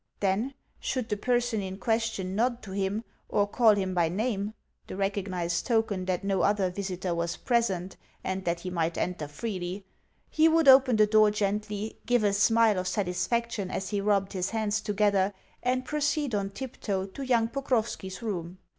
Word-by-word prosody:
Then, 210 +7 0 0.2
should 255 -4 -2
the 210 - +1
person 240 0 0
in 190 0 -5
question 220 -4 -1
nod 240 +2 0
to 195 - -8
him, 200 +3 -1 0.3
or 205 - +2
call 220 0 +5
him 190 -2 -1
by 170 -2 +2
name 210 +2 -2 0.3
(the - - -6
recognised 185 -4 -1
token 220 -6 +1
that 185 0 -1
no 195 -2 +1
other 200 -3 +2
visitor 185 -2 -3
was 170 0 -2
present, 195 -7 0 0.3
and 190 0 -2
that 170 -1 -1
he 185 - -5
might 165 -1 -1
enter 175 -5 -2
freely), 185 +3 -5 0.4
he 315 +1 +4
would 325 -2 +3
open 260 -2 +8
the 215 0 +6
door 215 0 +5
gently, 210 +1 -2
give 245 -2 +3
a 205 -1 +3
smile 215 0 +4
of 185 - -3
satisfaction 200 +3 -1
as 190 +1 -3
he 205 -2 -1
rubbed 200 -1 +1
his 185 0 -1
hands 215 -1 -1
together, 200 -1 +1 0.3
and 255 +1 0
proceed 295 -2 0
on 200 -1 0
tiptoe 200 -4 -4
to 195 +8 -9
young 240 -4 +2
Pokrovski's 230 -7 -2
room. 180 -5 -4
205 Hz, 170 wpm, -28 LUFS, 190-230 Hz, 0.4 s, open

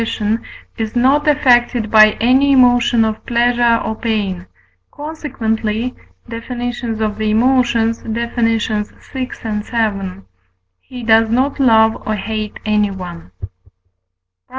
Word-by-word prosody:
is 220 0 -3
not 270 +5 +2
affected 245 -6 +2
by 215 -1 +7
any 260 +5 +3
emotion 245 -3 +4
of 220 0 -4
pleasure 240 -1 +2
or 220 - -2
pain, 200 -6 -3 0.4
consequently 245 -6 -3 0.3
(Def. 230 +1 -8
of 250 - -5 0.6
the 215 0 0
Emotions, 230 0 +1
vi. 230 +1 -3 1.6
vii.) 195 - -5 0.6
he 250 - -10
does 225 0 +4
not 260 +5 0
love 225 -4 +3
or 215 - 0
hate 215 0 -4
anyone. 190 - -2
PROP. 95 0 -9
230 Hz, 105 wpm, -17 LUFS, 215-250 Hz, 1.6 s, by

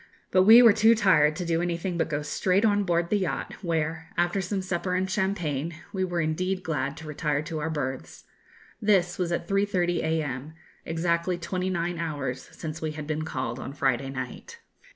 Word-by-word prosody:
But 185 0 +5
we 230 +4 +10
were 230 -3 +8
too 225 +2 +5
tired 165 -8 +4
to 175 - -4
do 165 0 +1
anything 175 +1 -2
but 165 - 0
go 145 0 -2
straight 185 +7 +1
on 205 -2 +3
board 170 -1 0
the 210 - +3
yacht, 185 - -3
where, 160 -1 -2
after 175 +3 +1
some 190 +1 -2
supper 180 0 -2
and 185 +1 0
champagne, 170 -6 -1 0.2
we 190 -1 0
were 175 -2 -1
indeed 185 +4 -1
glad 145 -3 -2
to 160 - -9
retire 150 -1 -1
to 160 0 -4
our 155 +2 -2
berths. 135 -4 -4 0.6
This 190 -4 +2
was 175 -1 0
at 170 0 -2
3.30 190 -3 +1
a.m., 155 -3 -2 0.3
exactly 170 +2 0
twenty 180 +2 -2
nine 175 -1 -2
hours 145 -6 -4
since 160 -1 -7
we 155 -1 -2
had 150 -1 -6
been 155 +1 -2
called 130 -5 -3
on 135 - -6
Friday 135 -2 0
night. 135 - -7
170 Hz, 190 wpm, -27 LUFS, 155-185 Hz, 0.6 s, we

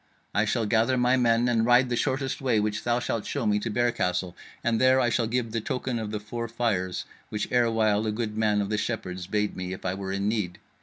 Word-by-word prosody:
I 105 +1 +2
shall 115 +1 0
gather 115 +4 +2
my 125 +1 +3
men, 120 -1 +3
and 115 -2 +2
ride 125 +2 +4
the 120 - 0
shortest 135 +2 -1
way, 125 -5 +2
which 105 0 -1
thou 120 0 +2
shalt 115 -3 -3
show 140 -5 -2
me, 105 -1 +2
to 110 - -3
Bear 120 +2 +2
Castle, 90 -3 -1 0.3
and 115 -1 +1
there 130 0 +5
I 120 -2 +2
shall 115 -1 +1
give 115 -1 -1
the 115 0 -1
token 125 +1 -2
of 110 -2 -4
the 105 0 -3
four 115 +3 -5
fires 110 -6 -1 0.2
which 105 -1 -2
erewhile 110 -3 +2
a - - +1
good 105 -1 -3
man 105 -1 +2
of 100 - -2
the 105 - +1
Shepherds 95 -7 -4
bade 105 +1 -1
me 90 0 -4
if 95 - -9
I 90 - 0
were 95 0 -4
in 100 +1 -1
need. 105 -5 -1
110 Hz, 245 wpm, -27 LUFS, 105-120 Hz, 0.3 s, there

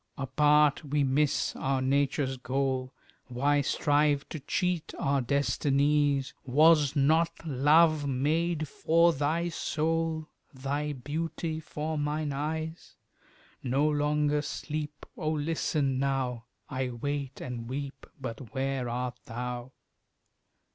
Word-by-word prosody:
Apart 150 +3 +3
we 145 0 0
miss 140 +2 +1
our 135 0 0
nature's 135 0 +1
goal, 130 0 -1 0.4
Why 140 +4 +2
strive 145 0 +2
to 155 - -5
cheat 175 +4 -1
our 140 0 +1
destinies? 140 +1 +1
Was 150 +1 +4
not 160 +4 +4 0.2
my 155 - -3
love 150 +2 +4
made 155 +4 0
for 170 +3 +3
thy 160 +5 0
soul? 160 -1 -1 0.3
Thy 145 +3 -2
beauty 155 +4 -3
for 155 0 -4
mine 150 0 -1
eyes? 160 +3 -4 0.7
No 135 +4 +1
longer 150 0 +1
sleep, 150 0 -5
Oh, 155 -2 -1
listen 150 -3 0
now! 130 -4 -1 0.2
I 130 -1 -2
wait 140 +3 -4
and 120 -2 -6
weep, 140 +1 -5
But 125 0 -7
where 135 -2 -1
art 125 +1 -3
thou? 125 +1 -5
145 Hz, 115 wpm, -29 LUFS, 135-155 Hz, 0.7 s, Was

